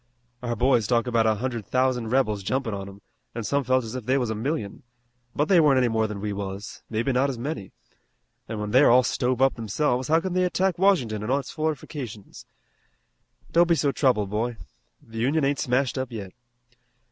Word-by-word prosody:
Our 120 -1 -2
boys 120 -2 +2
talk 120 -2 +2
about 115 -2 +2
a 110 - +3
hundred 120 0 -3
thousand 130 -2 +1
rebels 110 -5 +1
jumpin' 120 +2 -2
on 100 0 -5
'em, 100 +1 -14 0.3
an' 115 - -3
some 140 +6 0
felt 130 0 +2
as 110 0 -7
if 125 -3 -6
they 130 +2 +3
was 120 -4 -1
a - - 0
million, 110 -2 -3 0.5
but 150 - +1
they 185 -3 +5
weren't 145 -4 +5
any 125 -2 +3
more 110 -1 +1
than 105 -2 -6
we 105 0 -3
was, 100 +1 -6
maybe 115 +4 0
not 130 +2 +2
as 130 - -4
many, 120 - -5 0.8
an' 110 -2 -4
when 105 0 -4
they 130 +4 +6
are - - +6
all 125 +2 +6
stove 125 +1 0
up 135 - +4
themselves 125 +3 -1
how 160 +2 +4
can 185 +1 -4
they 185 0 +2
attack 180 0 0
Washington 130 - +2
in 105 - -4
its 135 0 -1
fortifications! 145 - -5 1.0
Don't 170 +1 +4
be 170 - +5
so 145 -3 +1
troubled, 110 -9 +1
boy. 115 +2 -2 0.5
The 115 0 -8
Union 140 +5 +1
ain't 140 0 0
smashed 130 +1 0
up 130 -1 -4
yet. 100 -5 -6
125 Hz, 205 wpm, -25 LUFS, 110-140 Hz, 1.0 s, they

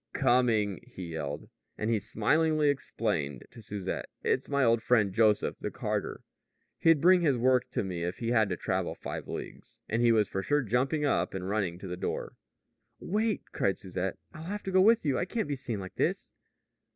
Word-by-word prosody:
"Coming!" 110 -6 +2
he 95 -8 -9
yelled. 75 -2 -4 0.3
And 110 +2 -1
he 110 - +2
smilingly 150 +9 +2
explained 85 - -2
to 115 - -12
Susette: 100 -3 -4
"It's 130 - 0
my 140 -1 +2
old 115 -1 +3
friend, 105 -5 +2
Joseph, 105 -1 +2
the - - -3
carter. - - -3 0.6
He'd 165 -2 +5
bring 180 +3 +6
his 145 -6 +2
work 125 +1 +2
to - - -1
me 90 -3 -4
if 90 +1 -3
he 115 - -3
had 110 -4 +3
to 90 - -2
travel - - -2
five - - -6
leagues." - - -8
And 115 +2 0
he 120 -1 +5
was 110 -3 +3
for 95 - -3 0.2
jumping 130 +7 +1
up 140 - 0
and 95 -1 -4
running 95 -4 -1
to 95 - -8
the 90 0 -5
door. - - -4 0.6
"Wait," 215 +3 -1
cried 95 - 0
Susette. 95 -1 -4 0.2
"I'll 155 +1 -9
have 205 +3 -4
to 190 - -3
go 185 0 +5
with 225 0 +5
you, 140 -3 +2
and - - 0
I - - 0
can't 220 -1 -2
be 145 - -1
seen 120 -5 -4
like 95 -1 -7
this." - - -1
115 Hz, 200 wpm, -29 LUFS, 95-145 Hz, 0.6 s, bring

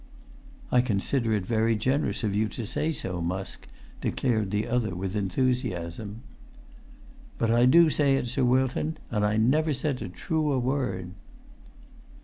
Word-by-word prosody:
"I 125 - +5
consider 115 +1 0
it 100 -4 0
very 115 +1 +2
generous 115 -1 0
of 105 -3 0
you 110 +2 +1
to 115 +2 -5
say 155 +9 -1
so, 90 - -4
Musk," 95 +3 -4 0.3
declared 110 -6 0
the 105 +2 0
other, 115 -6 0
with 95 +2 -4
enthusiasm. 105 - -2 1.1
"But 115 -1 +1
I 120 +2 +5
do 165 +4 +6
say 140 -2 +3
it, 135 - -1
Sir 130 +2 -1
Wilton, 130 +5 +1
and 105 -2 0
I 105 +1 +2
never 145 +7 +2
said 140 -1 -2
a 95 - -4
truer 150 - -1
word." 125 -9 -1
115 Hz, 145 wpm, -27 LUFS, 100-130 Hz, 1.1 s, do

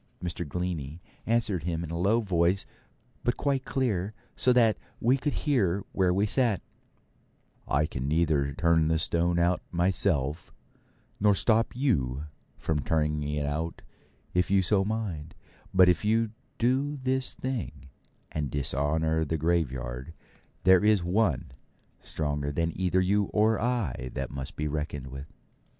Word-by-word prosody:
Mr. 85 -1 -4
Glennie 85 -3 -3 0.3
answered 110 -6 +2
him 85 0 -2
in 80 - -6
a - - -3
low 105 +6 +3
voice, 90 -2 +1 0.6
but 120 - 0
quite 135 -2 0
clear, 110 -7 -1 0.2
so 130 - +3
that 115 -3 +5 0.2
we 125 +3 +3
could 145 +2 -2
hear 100 - +2
where 95 -2 +2
we 100 +3 +2
sat: 115 -2 +1 1.0
'I 75 +2 +2
can 65 -4 -4
neither 75 -2 +2
turn 80 0 +3
the 80 0 +2
stone 85 +2 +1
out 85 +1 +2
myself, 85 -4 0 0.7
nor 105 0 +4
stop 115 +3 +2
you 75 - 0 0.3
from 80 -2 -1
turning 75 0 0
it 75 0 -2
out 80 +3 -3 0.5
if 90 0 +2
you 95 -1 +4
so 95 +2 +3
mind; 100 -8 -4 0.4
but 95 -1 +6
if 90 +2 +3
you 110 +1 +2 0.3
do 135 +5 +1
this 130 0 0
thing, 130 - -4 0.4
and 75 -3 -2
dishonour 75 +4 0
the 80 +1 -1
graveyard, 65 -4 -1 0.5
there 95 +1 +6
is 105 -3 +4
One 90 - +1 0.5
stronger 75 -2 -2
than 85 +2 -1
either 95 0 +1
you 100 +2 +2
or 110 +3 +2
I 110 - -1
that 65 0 -3
must 70 -1 -6
be 75 - -2
reckoned 75 -3 -4
with.' 70 +2 -7
85 Hz, 145 wpm, -28 LUFS, 75-105 Hz, 1.0 s, but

